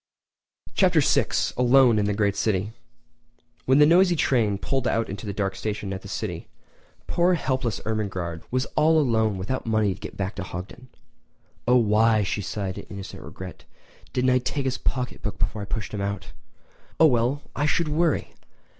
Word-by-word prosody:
Chapter 180 Hz, -4 st, +4 dB
VI: 140 Hz, -, +3 dB, 0.3 s
Alone 125 Hz, -2 st, +5 dB
in 105 Hz, -, +1 dB
the 105 Hz, 0 st, 0 dB
Great 100 Hz, -1 st, +1 dB
City[edit] 105 Hz, 0 st, 0 dB, 0.9 s
When 130 Hz, +1 st, +4 dB
the 150 Hz, -, +7 dB
noisy 175 Hz, +3 st, +5 dB
train 115 Hz, -9 st, +2 dB
pulled 130 Hz, +4 st, -1 dB
into 110 Hz, -1 st, -2 dB
the -, -, -2 dB
dark 95 Hz, -1 st, -2 dB
station 105 Hz, -1 st, -4 dB
at 95 Hz, -, -5 dB
the -, -, -10 dB
city, -, -, -5 dB, 0.6 s
poor 175 Hz, +1 st, +2 dB
helpless 130 Hz, -6 st, -1 dB
Ermengarde 95 Hz, -7 st, -3 dB
was 130 Hz, +1 st, 0 dB
all 155 Hz, +1 st, +4 dB
alone 110 Hz, -7 st, +1 dB
without 105 Hz, +8 st, -3 dB
the -, -, -3 dB
money 110 Hz, -3 st, +2 dB
to 95 Hz, -, -13 dB
get -, -, -8 dB
back 100 Hz, +1 st, -2 dB
to 100 Hz, -, -3 dB
Hogton. 95 Hz, +8 st, -8 dB, 0.8 s
"Oh 125 Hz, -, +5 dB
why," 110 Hz, -1 st, +3 dB
she 105 Hz, -, -2 dB
sighed 95 Hz, +2 st, -4 dB
in -, -, -10 dB
innocent 100 Hz, -2 st, -8 dB
regret, 90 Hz, -1 st, -10 dB, 0.5 s
"didn't 130 Hz, 0 st, +2 dB
I 125 Hz, -, +4 dB
take 135 Hz, +2 st, -3 dB
his 130 Hz, 0 st, -1 dB
pocketbook 125 Hz, -6 st, -3 dB
before 105 Hz, -, -2 dB
I -, -, -4 dB
pushed 110 Hz, +2 st, -4 dB
him 105 Hz, -, -3 dB
out? 100 Hz, -1 st, -4 dB, 0.7 s
Oh 160 Hz, -, +8 dB
well, 125 Hz, +1 st, +2 dB
I 145 Hz, +2 st, +1 dB
should 165 Hz, +1 st, +1 dB
worry! 155 Hz, +1 st, 0 dB
110 Hz, 175 wpm, -25 LUFS, 100-130 Hz, 0.9 s, Oh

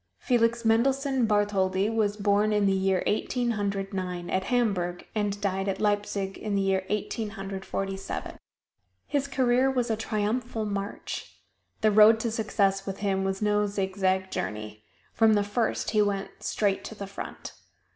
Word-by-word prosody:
Felix 235 Hz, -1 st, +1 dB
Mendelssohn 265 Hz, +2 st, +2 dB
Bartholdy 200 Hz, -2 st, +2 dB
was 215 Hz, -2 st, 0 dB
born 205 Hz, +1 st, +2 dB
in 210 Hz, -1 st, +2 dB
the 195 Hz, -, +3 dB
year 190 Hz, -1 st, +1 dB
Eighteen 240 Hz, +3 st, 0 dB
Hundred 200 Hz, -2 st, -2 dB
Nine, 180 Hz, -2 st, -4 dB
at 190 Hz, 0 st, 0 dB
Hamburg, 195 Hz, -8 st, 0 dB
and 205 Hz, -2 st, -1 dB
died 195 Hz, -1 st, -1 dB
at 195 Hz, -, -1 dB
Leipzig 205 Hz, -2 st, -1 dB
in 210 Hz, -2 st, -2 dB
the 200 Hz, -, +2 dB
year 190 Hz, -1 st, +1 dB
Eighteen 210 Hz, +1 st, -2 dB
Hundred 195 Hz, -2 st, -6 dB
Forty 195 Hz, 0 st, -3 dB
seven. 195 Hz, -, -6 dB, 0.7 s
His 280 Hz, -1 st, -1 dB
career 260 Hz, -1 st, +2 dB
was 250 Hz, -3 st, 0 dB
a -, -, +2 dB
triumphal 220 Hz, +1 st, -2 dB
march. 200 Hz, -1 st, -5 dB, 0.4 s
The 215 Hz, -, +4 dB
road 215 Hz, +2 st, +7 dB
to 230 Hz, -, -1 dB
success 200 Hz, -3 st, 0 dB
with 195 Hz, 0 st, -3 dB
him 195 Hz, -2 st, 0 dB
was 195 Hz, +1 st, -2 dB
no 210 Hz, 0 st, +2 dB
zigzag 190 Hz, -1 st, 0 dB
journey 105 Hz, +2 st, -5 dB, 0.3 s
from 225 Hz, -1 st, +5 dB
the 205 Hz, -, +2 dB
first 210 Hz, +3 st, -1 dB
he 215 Hz, -1 st, +3 dB
went 200 Hz, -1 st, -2 dB
straight 200 Hz, -2 st, 0 dB
to 220 Hz, -, -7 dB
the 200 Hz, -, -6 dB
front. 195 Hz, 0 st, -8 dB
205 Hz, 165 wpm, -27 LUFS, 195-220 Hz, 0.7 s, road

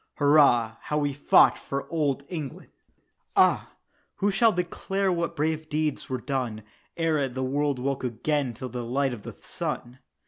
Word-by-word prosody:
"Hurrah, 140 Hz, -6 st, +4 dB
how 150 Hz, -, -2 dB
we 145 Hz, -1 st, 0 dB
fought 145 Hz, -, +5 dB
for 140 Hz, 0 st, -4 dB
Old 145 Hz, -4 st, 0 dB
England!" 155 Hz, -7 st, -6 dB, 0.6 s
Ah! -, -, +4 dB, 0.5 s
who 200 Hz, +1 st, +1 dB
shall 225 Hz, +3 st, +4 dB
declare 190 Hz, +2 st, -1 dB
what 170 Hz, -1 st, -1 dB
brave 155 Hz, +1 st, -1 dB
deeds 150 Hz, -1 st, -1 dB
were 130 Hz, -1 st, -2 dB
done, 125 Hz, -6 st, -3 dB, 0.3 s
Ere 155 Hz, -5 st, +1 dB
the 130 Hz, +1 st, -4 dB
world 140 Hz, +1 st, 0 dB
woke 135 Hz, +2 st, -2 dB
again 130 Hz, +1 st, -1 dB
to 130 Hz, +3 st, -6 dB
the 125 Hz, 0 st, -5 dB
light 135 Hz, +2 st, 0 dB
of 115 Hz, -, -7 dB
the -, -, -9 dB
sun? 125 Hz, +2 st, -5 dB
140 Hz, 160 wpm, -26 LUFS, 130-155 Hz, 0.6 s, fought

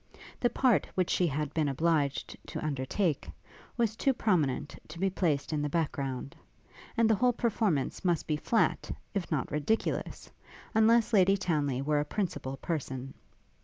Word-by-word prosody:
The 240 Hz, -, +3 dB
part 245 Hz, -1 st, +2 dB
which 185 Hz, -2 st, +1 dB
she 180 Hz, -, +3 dB
had 150 Hz, 0 st, -2 dB
been 155 Hz, -2 st, +1 dB
obliged 145 Hz, 0 st, 0 dB
to -, -, -5 dB
undertake, 150 Hz, +3 st, -1 dB, 0.5 s
was 225 Hz, -2 st, +1 dB
too 270 Hz, +4 st, +2 dB
prominent 170 Hz, -, 0 dB
to 155 Hz, -, -10 dB
be 190 Hz, +2 st, +1 dB
placed 160 Hz, -5 st, 0 dB
in 150 Hz, -, 0 dB
the 145 Hz, -, -1 dB
back 160 Hz, 0 st, 0 dB
ground; 135 Hz, 0 st, -4 dB, 0.6 s
and 230 Hz, -1 st, +5 dB
the 220 Hz, -, +4 dB
whole 245 Hz, +3 st, +3 dB
performance 210 Hz, -, 0 dB
must 175 Hz, -3 st, +1 dB
be 155 Hz, -, 0 dB
flat, 225 Hz, +9 st, +1 dB, 0.2 s
if 200 Hz, -4 st, -2 dB
not 150 Hz, -4 st, -1 dB
ridiculous, 150 Hz, +10 st, -1 dB, 0.4 s
unless 225 Hz, +1 st, +4 dB
Lady 195 Hz, -1 st, +5 dB
Townly 145 Hz, -8 st, 0 dB
were 150 Hz, +1 st, +2 dB
a 145 Hz, -, 0 dB
principal 150 Hz, -8 st, -3 dB
person. 135 Hz, -5 st, -4 dB
165 Hz, 160 wpm, -30 LUFS, 145-210 Hz, 0.6 s, and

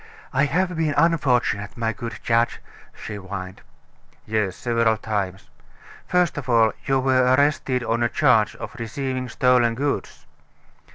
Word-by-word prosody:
"I 140 Hz, +2 st, +3 dB
have 180 Hz, +5 st, 0 dB
been 155 Hz, -2 st, 0 dB
unfortunate, 125 Hz, -11 st, +1 dB
my 115 Hz, -1 st, -1 dB
good 115 Hz, +1 st, -6 dB
judge," 115 Hz, 0 st, +1 dB, 0.4 s
she 105 Hz, -, -7 dB
whined. 95 Hz, -1 st, -7 dB, 0.6 s
"Yes, 105 Hz, -4 st, -1 dB
several 115 Hz, -2 st, +1 dB
times. 100 Hz, -4 st, -3 dB, 0.6 s
First 180 Hz, -4 st, +1 dB
of 130 Hz, -2 st, -9 dB
all, 115 Hz, -2 st, +4 dB
you 135 Hz, -1 st, +2 dB
were 130 Hz, -1 st, +3 dB
arrested 140 Hz, -3 st, +1 dB
on 115 Hz, 0 st, -1 dB
a 120 Hz, -, +2 dB
charge 110 Hz, -3 st, +3 dB
of -, -, -8 dB
receiving 130 Hz, +2 st, -3 dB
stolen 125 Hz, -3 st, +3 dB
goods." 140 Hz, +3 st, -3 dB
120 Hz, 135 wpm, -23 LUFS, 110-135 Hz, 0.6 s, all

